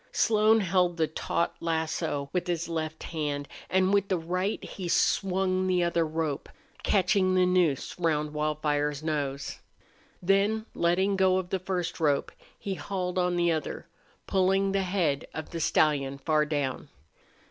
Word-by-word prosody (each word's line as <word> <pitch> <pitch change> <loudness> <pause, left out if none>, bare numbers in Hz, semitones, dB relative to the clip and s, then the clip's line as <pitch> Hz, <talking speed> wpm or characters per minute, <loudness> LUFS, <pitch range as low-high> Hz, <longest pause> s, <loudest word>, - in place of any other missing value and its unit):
Slone 220 0 +4
held 180 -2 +1
the 160 - +3
taut 160 +2 -2
lasso 160 -4 -2
with 180 0 -1
his 170 -1 -1
left 160 -1 -4
hand, 145 -3 -3 0.2
and 190 +1 +2
with 200 -1 +3
the 190 -3 +1
right 180 +5 -2
he 185 -3 -6
swung 185 0 +1
the 180 -1 +2
other 170 -1 +1
rope, 155 -2 -3 0.3
catching 190 -2 +2
the 185 0 +4
noose 180 -4 +1
round 150 -3 0
Wildfire's 150 -1 -1
nose. 140 -3 -3 0.6
Then 200 +4 +2
letting 190 +3 +1
go 190 -1 +4
of 185 -1 -3
the 190 - 0
first 180 -2 -3
rope 145 -3 +1 0.3
he 195 - -4
hauled 185 -1 -3
on 180 0 +1
the 175 -1 +2
other, 155 -2 -3 0.4
pulling 195 +1 +2
the 195 0 +1
head 180 -7 0
of 160 - -6
the 170 - -4
stallion 140 -4 +2
far 150 +1 +1
down. 145 -4 -2
175 Hz, 150 wpm, -28 LUFS, 155-185 Hz, 0.6 s, Slone